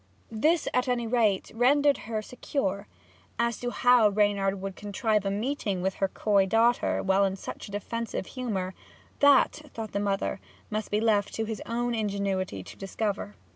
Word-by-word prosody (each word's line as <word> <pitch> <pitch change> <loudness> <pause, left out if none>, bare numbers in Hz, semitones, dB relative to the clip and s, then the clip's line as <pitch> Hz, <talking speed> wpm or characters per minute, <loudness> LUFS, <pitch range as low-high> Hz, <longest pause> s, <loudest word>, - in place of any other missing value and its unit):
This, 305 +9 +2
at 250 +1 +1
any 245 -2 0
rate, 220 -5 +1
rendered 280 +5 +3
her 215 -1 -2
secure. 205 -5 -3 0.5
As 235 -1 0
to 245 - -2
how 245 -3 +5
Reynard 200 -1 +1
would 195 0 -5
contrive 210 0 -1
a - - +2
meeting 205 -3 -2
with 190 0 0
her 195 - +4
coy 200 0 +2
daughter 230 +4 +2
while 195 +1 +3
in 195 -1 +1
such 195 - -8
a - - -11
defensive 225 +1 -4
humour, 200 -8 -3 0.5
that, 285 +1 +5
thought 220 -2 -5
her 200 - 0
mother, 200 -1 -1 0.3
must 215 0 -2
be 210 - +1
left 210 -3 +2
to 225 - -1
his 220 -1 -5
own 240 +1 -1
ingenuity 200 - -2
to - - -11
discover. 195 - -3
215 Hz, 170 wpm, -28 LUFS, 195-235 Hz, 0.5 s, how